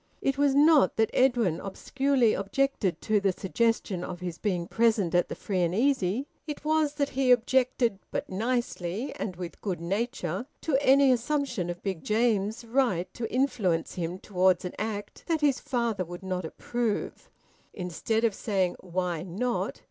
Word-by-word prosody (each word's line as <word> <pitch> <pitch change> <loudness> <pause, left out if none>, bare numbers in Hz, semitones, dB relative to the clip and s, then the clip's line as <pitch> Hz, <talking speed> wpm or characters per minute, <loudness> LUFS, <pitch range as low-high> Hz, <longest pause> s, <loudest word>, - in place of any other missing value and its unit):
It 275 - 0
was 280 -1 +2
not 295 0 +5
that 220 0 +2
Edwin 240 -10 +3
obscurely 260 +4 +1
objected 200 - 0
to 215 -1 +2
the 195 -1 +2
suggestion 195 -1 -1
of 180 -1 -6
his 175 -2 -5
being 180 -5 -1
present 220 -6 +2
at 175 0 +2
the - - -4
free 190 -3 -2
and 175 +1 +1
easy; 250 0 +1 0.2
it 300 0 -6
was 310 -1 +2
that 285 -1 0
he 265 -1 0
objected 245 -3 +3
(but - - -3
nicely, 225 0 -2
and 185 -4 -4
with 175 -1 -7
good 185 -5 -2
nature) 195 - -2
to 315 - 0
any 275 0 +6
assumption 250 - 0
of 175 0 -6
Big 190 -5 -3
James's 220 0 +1
right 230 -8 0
to 230 -2 -4
influence 220 -11 0
him 175 0 -3
towards 185 -2 +2
an 180 - -4
act 210 -1 -4
that 325 -2 0
his 285 -2 +3
father 235 -6 -1
would 175 +2 -9
not 185 -2 -3
approve. 230 +6 -3 0.4
Instead 195 +5 -2
of 230 -3 +3
saying, 195 -4 -1
"Why 180 -2 -2
not?" 210 +8 -2
215 Hz, 165 wpm, -28 LUFS, 180-255 Hz, 0.4 s, any